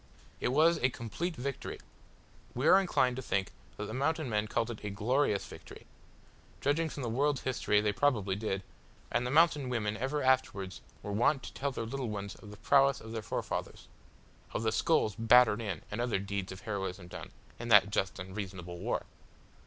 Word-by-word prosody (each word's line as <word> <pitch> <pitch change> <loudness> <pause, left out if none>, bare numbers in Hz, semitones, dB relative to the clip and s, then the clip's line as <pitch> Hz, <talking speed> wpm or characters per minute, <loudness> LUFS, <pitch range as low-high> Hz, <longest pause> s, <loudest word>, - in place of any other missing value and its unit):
It - - 0
was 155 +6 +4
a 130 - +3
complete 130 - -4
victory. 140 0 -5 0.8
We 130 +5 +1
are 190 - +8
inclined 130 -9 +1
to - - -3
think 100 -5 -1 0.3
that 105 - -4
the 110 - -6
Mountain 140 +1 0
men 105 0 +1
called 115 +2 -1
it 110 - -9
a 105 - -3
"glorious" 105 +1 +1
victory. - - -12 0.7
Judging 160 +3 +1
from 140 - -6
the - - -2
world's 140 +4 +1
history 105 -5 +1
they 105 -1 +1
probably 105 -6 +1
did, 100 -2 -2 0.5
and 125 - +1
the - - -2
mountain 150 -2 +4
women 110 -4 -1
ever 135 +6 -1
afterwards 115 -8 +1 0.2
were 105 - -4
wont 120 +6 +2
to - - -8
tell 140 +1 -2
their 115 - -4
little 125 +1 -3
ones 100 -1 -4
of 105 - -13
the 105 - -10
prowess 135 +5 +4
of 110 - -10
their 115 -1 -3
forefathers - - -4 0.7
of - - -2
the 110 - +2
skulls 110 -3 +2
battered 115 0 +5
in 100 -5 -4
and 105 +3 -2
other 120 -4 +1
deeds 100 -1 -4
of 95 - -9
heroism 95 -4 -4
done - - -8 0.3
in 120 - -5
that 105 -3 +6
just 95 -2 0
and 95 0 -8
reasonable 90 -4 -6
war! - - -2
115 Hz, 190 wpm, -32 LUFS, 100-135 Hz, 0.8 s, are